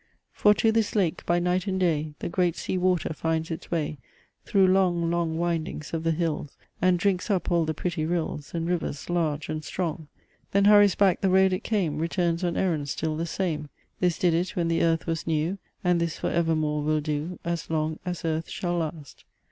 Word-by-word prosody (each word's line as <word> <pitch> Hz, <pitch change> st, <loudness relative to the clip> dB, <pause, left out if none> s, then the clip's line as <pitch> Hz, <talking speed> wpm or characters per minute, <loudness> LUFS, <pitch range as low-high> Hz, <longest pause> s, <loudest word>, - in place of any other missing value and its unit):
For 210 Hz, 0 st, +4 dB
to 220 Hz, +2 st, +3 dB
this 225 Hz, -1 st, 0 dB
lake, 185 Hz, -6 st, +1 dB
by 175 Hz, -, +3 dB
night 180 Hz, +2 st, 0 dB
and 190 Hz, -1 st, 0 dB
day, 155 Hz, -4 st, 0 dB
The -, -, -2 dB
great 175 Hz, -1 st, +1 dB
Sea -, -, -3 dB
water 180 Hz, -3 st, +1 dB
finds 160 Hz, +1 st, -1 dB
its 160 Hz, -, -6 dB
way 155 Hz, -3 st, -2 dB, 0.5 s
Through 195 Hz, -2 st, +4 dB
long, 180 Hz, -3 st, +2 dB
long 170 Hz, -2 st, 0 dB
windings 165 Hz, -3 st, -2 dB
of 165 Hz, -1 st, -2 dB
the 165 Hz, -, +1 dB
hills, 160 Hz, -3 st, -2 dB, 0.2 s
And 180 Hz, 0 st, +4 dB
drinks 185 Hz, +3 st, 0 dB
up 190 Hz, -2 st, 0 dB
all 170 Hz, -2 st, +3 dB
the 155 Hz, 0 st, -2 dB
pretty 175 Hz, -1 st, -2 dB
rills 160 Hz, -4 st, -2 dB
And 165 Hz, -1 st, -1 dB
rivers 170 Hz, -3 st, -2 dB
large 155 Hz, -4 st, 0 dB
and 155 Hz, 0 st, -4 dB
strong: 160 Hz, 0 st, -3 dB, 0.5 s
Then 200 Hz, 0 st, +4 dB
hurries 205 Hz, -2 st, +7 dB
back 195 Hz, -3 st, +3 dB
the 195 Hz, -, +2 dB
road 190 Hz, 0 st, +4 dB
it 185 Hz, -, -2 dB
came 175 Hz, -9 st, 0 dB
Returns 170 Hz, +1 st, 0 dB
on 175 Hz, -1 st, 0 dB
errand 155 Hz, -6 st, 0 dB
still 155 Hz, +2 st, -2 dB
the 165 Hz, +2 st, -2 dB
same; 155 Hz, -5 st, -2 dB, 0.3 s
This 180 Hz, -2 st, +1 dB
did 175 Hz, -2 st, +2 dB
it 175 Hz, +3 st, -1 dB
when 170 Hz, -2 st, 0 dB
the 165 Hz, 0 st, +1 dB
earth 165 Hz, -1 st, +2 dB
was 165 Hz, -1 st, -3 dB
new; 165 Hz, +4 st, 0 dB, 0.2 s
And 180 Hz, -1 st, +2 dB
this 170 Hz, -2 st, -1 dB
for -, -, -2 dB
evermore 155 Hz, -3 st, +1 dB
will 155 Hz, +1 st, +1 dB
do, 150 Hz, +3 st, -3 dB
As 170 Hz, -1 st, -3 dB
long 155 Hz, 0 st, -1 dB
as 175 Hz, -2 st, -4 dB
earth 160 Hz, 0 st, -1 dB
shall 175 Hz, -1 st, -2 dB
last. 155 Hz, -3 st, -5 dB
170 Hz, 205 wpm, -26 LUFS, 160-180 Hz, 0.5 s, hurries